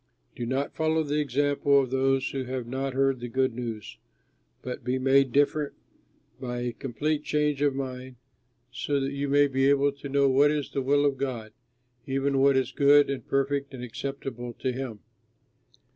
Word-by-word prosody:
Do 120 - -4
not 135 +3 -2
follow 160 0 +1
the 150 0 -1
example 145 0 +2
of 130 -2 -1
those 135 0 +1
who 135 -1 -3
have 130 -1 -4
not 130 +2 -3
heard 135 -1 +2
the 120 - -5
good 130 +1 0
news, 115 -3 -6 0.7
but 125 - -6
be 125 +1 0
made 135 0 +3
different 145 +2 +1 0.7
by 120 -1 -4
a 120 0 -2
complete 145 +5 -2
change 150 -2 0
of 145 -2 +2
mind, 130 -1 -5 0.6
so 140 +3 -1
that 135 0 -2
you 140 0 -3
may 145 +1 +5
be 135 0 +2
able 140 0 +3
to 140 0 -9
know 140 0 +3
what 135 +2 +4
is 150 -2 -2
the 135 - -1
will 145 +2 +2
of 140 -2 0
God, 115 -5 -4 0.5
even 135 0 0
what 135 0 +4
is 130 - 0
good 145 0 +5
and 135 - -5
perfect 140 0 -1
and 125 - -8
acceptable 125 -1 -6
to 130 +2 -2
him. 125 -5 -6
135 Hz, 180 wpm, -27 LUFS, 130-140 Hz, 0.7 s, may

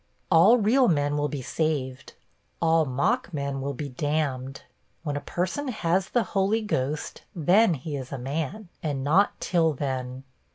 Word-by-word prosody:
'All 185 +8 +7
real 245 +4 +4
men 145 -3 +1
will 145 0 0
be 145 -3 -5
saved; 135 -4 -2 0.5
all 165 -1 +3
mock 185 - 0
men 140 -3 -3
will 140 +1 -3
be 145 +2 -4
damned. 135 -1 -2 0.4
When 145 -3 -2
a 145 - -3
person 185 - -3
has 190 -4 0
the 240 - +2
Holy 205 +3 +2
Ghost, 150 -7 -2
then 180 +3 +4
he 145 +2 -5
is 130 -2 -6
a 140 - -3
man, 155 - -4
and 140 -4 -2
not 175 +8 +3
till 165 -3 +2
then. 130 -2 -4
155 Hz, 160 wpm, -26 LUFS, 135-185 Hz, 0.5 s, All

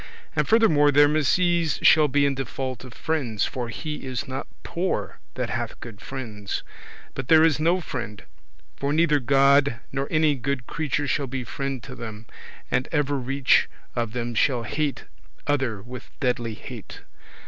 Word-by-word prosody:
And - - +1
furthermore, 170 -11 +5
their 145 +1 +6
misease 165 +2 +2
shall 155 -1 +7
be 145 +1 +3
in 140 - +2
default 130 -2 -4
of 130 - -10
friends, 120 -7 -1
for 120 -2 -4
he 150 +6 -4
is 130 +2 -4
not 130 +1 -4 0.2
poor 170 - -2 0.2
that - - -2
hath - - -3
good 115 -4 -10
friends: 110 -7 -5 0.5
but 135 -2 -5
there 160 -1 +7
is 160 -3 +4
no 170 +4 +3
friend; 120 - -5 0.5
for 140 +1 -1
neither 155 -2 +4
God 140 -1 +4
nor 135 +1 -2
any 155 -1 +3
good 135 -1 -2
creature 145 -1 -1
shall 140 +1 0
be 130 0 -3
friend 135 0 -4
to 135 - -8
them, 110 -2 -8 0.5
and 125 - 0
evereach 140 -3 +2 0.3
of 115 -2 -1
them 120 -1 -3
shall 120 +1 +2
hate 145 +5 -2 0.4
other 130 -8 0
with 125 +1 -9
deadly 120 -4 -1
hate. - - -9
135 Hz, 160 wpm, -25 LUFS, 120-150 Hz, 0.5 s, shall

